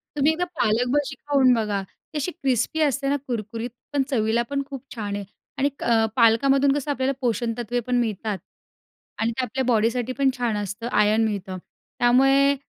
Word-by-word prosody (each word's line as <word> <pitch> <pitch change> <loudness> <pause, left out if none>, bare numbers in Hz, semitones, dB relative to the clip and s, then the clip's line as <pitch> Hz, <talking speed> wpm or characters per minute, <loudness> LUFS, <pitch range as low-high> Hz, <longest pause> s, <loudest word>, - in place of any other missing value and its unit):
तुम्ही 295 +1 +3
एकदा 345 +3 -1
पालक 225 +3 +2
भजी 290 -1 0
खाऊन 275 -2 +3
बघा. 210 -4 0
ती 245 +9 -12
अशी 295 +5 -1
क्रिस्पी 285 -1 -1
असते 280 -2 +1
ना 285 - +2
कुरकुरीत. 230 0 -4 0.2
पण 280 -2 +2
चवीला 230 -2 +1
पण 280 0 -1
खूप 270 -3 -7
छान 205 -3 -3
आहे 205 - -4 0.3
आणि 280 +1 +2
क 225 -2 +3
पालकामधून 270 +4 +4
कसं 290 0 -2
आपल्याला 270 -1 0
पोषणतत्त्वे 240 -1 -1
पण 250 - +1
मिळतात 215 -3 -2 0.8
आणि 225 +1 +1
ते 255 +3 -2
आपल्या 260 +2 -2
बॉडीसाठी 235 +1 +1
पण 275 -1 +3
छान 235 -3 0
असतं, 205 +3 -4
आयर्न 210 +1 +3
मिळतं. 195 -3 -3 0.4
त्यामुळे 270 +3 +4
245 Hz, 170 wpm, -24 LUFS, 220-275 Hz, 0.8 s, पालकामधून